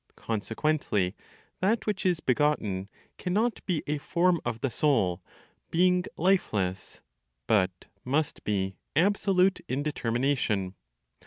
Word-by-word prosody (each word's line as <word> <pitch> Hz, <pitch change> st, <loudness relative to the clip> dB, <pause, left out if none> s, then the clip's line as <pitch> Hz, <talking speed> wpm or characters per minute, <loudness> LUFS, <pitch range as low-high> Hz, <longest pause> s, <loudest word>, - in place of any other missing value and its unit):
Consequently, 110 Hz, -2 st, -1 dB, 0.4 s
that 215 Hz, +5 st, +1 dB
which 205 Hz, -3 st, 0 dB
is 175 Hz, -3 st, +1 dB
begotten 115 Hz, -8 st, +1 dB, 0.3 s
cannot 215 Hz, +6 st, 0 dB
be 175 Hz, -6 st, 0 dB
a 150 Hz, 0 st, -1 dB
form 170 Hz, +3 st, +2 dB
of 115 Hz, -, -3 dB
the 135 Hz, -, 0 dB
Soul, 115 Hz, -, +2 dB, 0.5 s
being 180 Hz, +1 st, +3 dB
lifeless, 105 Hz, -, 0 dB, 0.4 s
but 95 Hz, +1 st, +1 dB, 0.2 s
must 145 Hz, +4 st, -1 dB
be 95 Hz, -3 st, -1 dB, 0.2 s
absolute 190 Hz, +2 st, +3 dB
in 135 Hz, +3 st, -1 dB
determination. 120 Hz, -8 st, 0 dB
145 Hz, 105 wpm, -28 LUFS, -, 0.5 s, being